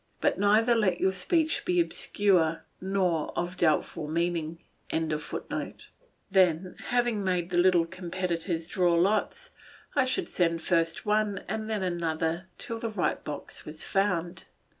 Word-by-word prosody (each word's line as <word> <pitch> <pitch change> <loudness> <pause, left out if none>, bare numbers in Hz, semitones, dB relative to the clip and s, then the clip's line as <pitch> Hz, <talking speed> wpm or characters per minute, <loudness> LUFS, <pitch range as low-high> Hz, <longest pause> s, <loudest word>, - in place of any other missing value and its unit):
But - - +1
neither 215 +4 +4
let 205 -6 +2
your 190 - +3
speech 310 - +1
be 360 0 +1
obscure 185 - +1 0.2
nor 185 -4 0
of 175 +1 -2
doubtful 155 -2 +1
meaning.] 165 0 -1 0.3
Then 175 - -2
having 240 -4 +1
made 180 -2 -1
the 175 - +2
little 175 -2 +4
competitors 170 -1 -3
draw 175 -1 +2
lots, 200 +5 +1 0.4
I 275 -3 +4
should 255 - 0
send 165 -2 0
first 165 -2 +1
one 210 -2 +1
and 220 +1 -3
then 215 -3 -1
another 170 0 -1
till 230 -4 -5
the 230 - -3
right 210 -5 -1
box 150 -1 -6
was 155 +1 -6
found. 180 -3 -1
180 Hz, 135 wpm, -28 LUFS, 165-205 Hz, 0.4 s, neither